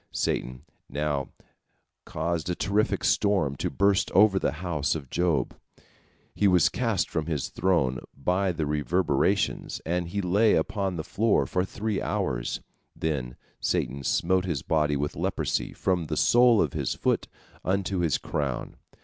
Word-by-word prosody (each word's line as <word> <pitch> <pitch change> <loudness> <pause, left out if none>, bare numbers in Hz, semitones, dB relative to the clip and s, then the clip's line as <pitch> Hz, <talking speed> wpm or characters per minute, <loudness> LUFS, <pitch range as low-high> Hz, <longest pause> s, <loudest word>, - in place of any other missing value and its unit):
Satan 65 0 -2 0.3
now 75 -2 -2 0.8
caused 85 0 -2
a 90 - 0
terrific 105 +3 0
storm 95 -10 +2
to - - -1
burst 100 -1 +2
over 95 0 +5
the - - 0
house 80 -5 0
of 70 -5 -7
Job. 85 -7 +1 0.8
He 105 - +2
was 90 -4 +5
cast 115 -8 0
from 80 -2 -3
his 75 -5 -2
throne 70 -9 +1 0.2
by 90 +7 +1
the 80 -3 -2
reverberations, 75 +1 0
and 85 +1 -1
he 100 +4 -3
lay 100 +4 +3
upon 95 -3 -1
the 80 - -3
floor 110 +6 +1
for 90 - 0
three 100 +2 -3
hours. 70 -13 -2 0.3
Then 65 -6 -2 0.2
Satan 70 +2 -1
smote 90 +7 +1
his 80 -8 -2
body 75 -2 +1
with 75 +1 -2
leprosy - - -1
from 90 -4 -1
the - - -3
sole 120 -2 +5
of 75 - -3
his - - -2
foot - - 0 0.4
unto 95 0 0
his 85 -6 +2
crown. 70 -4 -3
85 Hz, 150 wpm, -27 LUFS, 75-95 Hz, 0.8 s, over